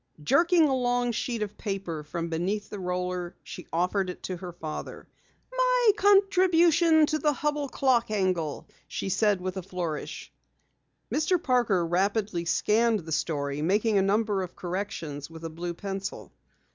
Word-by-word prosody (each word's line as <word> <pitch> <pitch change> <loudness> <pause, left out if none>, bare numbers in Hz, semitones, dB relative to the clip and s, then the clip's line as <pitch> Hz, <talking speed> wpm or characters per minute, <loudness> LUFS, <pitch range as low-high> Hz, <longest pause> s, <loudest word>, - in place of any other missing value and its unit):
Jerking 335 - +4
a 270 - +1
long 245 -1 +1
sheet 235 -1 -2
of 210 0 -8
paper 195 -7 -4
from 165 +3 -4
beneath 185 +6 -2
the 205 - -5
roller, 180 -1 -3
she 180 - -9
offered 180 +3 0
it 180 - -8
to 185 - -4
her 180 0 -7
father. 160 -3 -7 0.5
"My - - +4
contribution 360 -5 +4
on - - +7
the 300 0 +1
Hubell 295 0 -1
Clock 255 -4 +2
angle," 185 -8 -1 0.2
she - - -4
said 205 0 +2
with 185 +1 -4
a - - -2
flourish. 175 -4 -5 0.8
Mr. 315 +4 +2
Parker 240 - +2
rapidly 190 +1 0
scanned 220 +4 +2
the 160 0 -9
story, 145 -2 -1
making 205 +5 +2
a - - +3
number 205 0 +1
of 180 -2 -6
corrections 175 -6 -5
with 165 0 -11
a 165 - -5
blue 170 +2 -5
pencil. 195 +1 -5
195 Hz, 155 wpm, -27 LUFS, 175-250 Hz, 0.8 s, on